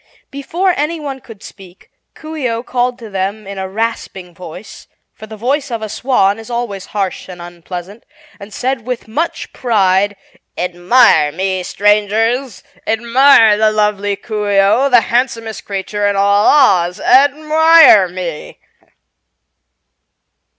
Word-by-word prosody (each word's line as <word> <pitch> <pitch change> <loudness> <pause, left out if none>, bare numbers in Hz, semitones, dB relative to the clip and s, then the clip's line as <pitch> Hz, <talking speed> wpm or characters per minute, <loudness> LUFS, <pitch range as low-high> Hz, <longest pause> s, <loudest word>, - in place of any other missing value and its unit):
Before 335 +7 -1
anyone 295 -3 -4
could 225 -4 -14
speak 185 -2 -15 0.2
Coo 315 0 -9
ee 270 -6 -2
oh 230 +1 -4
called 250 0 -2
to 230 - -11
them 195 +2 -4
in 195 0 -8
a 190 0 -5
rasping 195 -4 -5
voice 180 +3 -12 0.3
for 215 - -12
the 220 0 -10
voice 270 +6 -2
of 230 -2 -5
a 215 - -5
swan 215 -4 0
is 225 - -12
always 235 -5 -5
harsh 190 -1 -3
and 180 -1 -10
unpleasant 175 +4 -9 0.4
and 200 +1 -11
said 250 +2 -3
with 250 -3 -5
much 310 +10 -4
pride: 205 -4 +1 0.4
"Admire 175 -2 +2
me, 185 +3 -2
Strangers! 215 +5 0 0.2
Admire 230 -1 +4
the 215 0 +3
lovely 210 -1 -1
Coo 210 -1 -5
ee 200 - +1
oh, 220 +8 +3
the 245 -3 +5
handsomest 230 -1 -2
creature 205 +1 -3
in 200 - 0
all 200 +1 +2
Oz. 185 -11 +3
Admire 305 - +5
me!" 175 -3 -7
215 Hz, 135 wpm, -15 LUFS, 195-250 Hz, 0.4 s, the